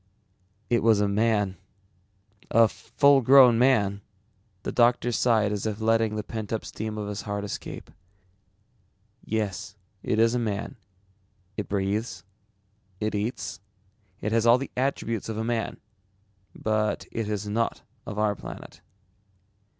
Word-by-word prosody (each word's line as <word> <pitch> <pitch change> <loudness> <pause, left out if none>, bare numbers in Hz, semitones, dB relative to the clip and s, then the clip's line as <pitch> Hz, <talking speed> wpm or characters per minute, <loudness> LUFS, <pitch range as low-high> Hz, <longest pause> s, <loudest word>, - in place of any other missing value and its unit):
"It 120 - +2
was 110 -2 +4
a 105 - +2
man, 105 -2 +1 0.9
a 115 0 +6
full 140 +4 +3
grown 125 -2 +7
man." 105 -6 +3 0.6
The - - -3
doctor 120 0 +3
sighed 110 -3 +2
as 105 +1 -2
if 105 0 -3
letting 110 -1 +2
the 105 - -2
pent 110 -1 -6
up 110 - -2
steam 110 0 -5
of 105 -1 -4
his 105 -1 -4
heart 100 +1 -4
escape. 100 - -7 1.3
"Yes, 105 -3 -3 0.3
it 105 - -1
is 115 +1 +4
a 125 - +1
man. 110 -3 -3 0.8
It 105 - -4
breathes, 100 -1 -2 0.8
it 110 0 -1
eats, 105 +4 -3 0.6
it 105 - -2
has 115 0 +2
all 120 +1 +7
the 135 +1 -6
attributes 120 -5 -1
of 110 - -3
a 110 - -1
man. 115 0 -2 0.8
But 110 0 -1
it 115 -2 -3
is 105 -1 -3
not 115 +3 -1 0.2
of 105 - -5
our 105 -1 +2
planet." - - -10
110 Hz, 140 wpm, -26 LUFS, 105-115 Hz, 1.3 s, grown